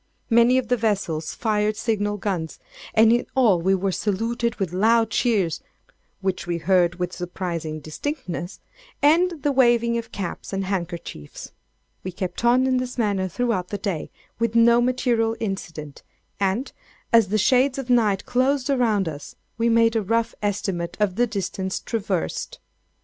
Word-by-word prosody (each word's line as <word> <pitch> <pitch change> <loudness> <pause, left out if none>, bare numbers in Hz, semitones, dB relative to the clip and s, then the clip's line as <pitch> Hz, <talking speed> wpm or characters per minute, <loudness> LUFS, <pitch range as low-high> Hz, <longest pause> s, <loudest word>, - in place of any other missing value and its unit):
Many 235 +2 +5
of 260 -2 0
the 245 - +2
vessels 195 -8 -1
fired 215 -1 0
signal 205 -2 -1
guns; 185 -6 -3 0.4
and 225 +1 +6
in 240 - 0
all 220 -10 +4
we 190 +3 +3
were 190 +1 -1
saluted 230 +5 -1
with 190 -4 -3
loud 225 +3 +3
cheers 200 -10 +1 0.6
(which 190 -2 -2
we 170 -1 -1
heard 175 0 +2
with 180 0 -3
surprising 170 -3 -4
distinctness) 175 - -5 0.4
and 330 +1 +3
the 290 - +2
waving 235 -3 +3
of 230 - -9
caps 195 0 -6
and 195 0 -1
handkerchiefs. 170 - -5 0.5
We 185 - -4
kept 180 +3 -5
on 245 +2 +4
in 260 -1 +2
this 250 0 -4
manner 200 -5 0
throughout 200 -1 -1
the 205 - -4
day, 195 -5 -3 0.3
with 230 -1 0
no 235 +1 +6
material 240 -2 +1
incident, 165 -9 -5 0.4
and, 200 +7 0 0.4
as 230 -3 +6
the 210 +3 0
shades 255 +5 +3
of 265 -2 -3
night 215 -5 +2
closed 265 +2 +1
around 220 -8 +2
us, 145 -2 -7 0.2
we 230 +1 +2
made 230 0 +4
a 225 - +2
rough 230 +3 0
estimate 195 -4 -2
of 205 -3 +2
the 245 +3 +2
distance 190 -2 -3
traversed. 195 - -3
210 Hz, 155 wpm, -23 LUFS, 185-235 Hz, 0.6 s, and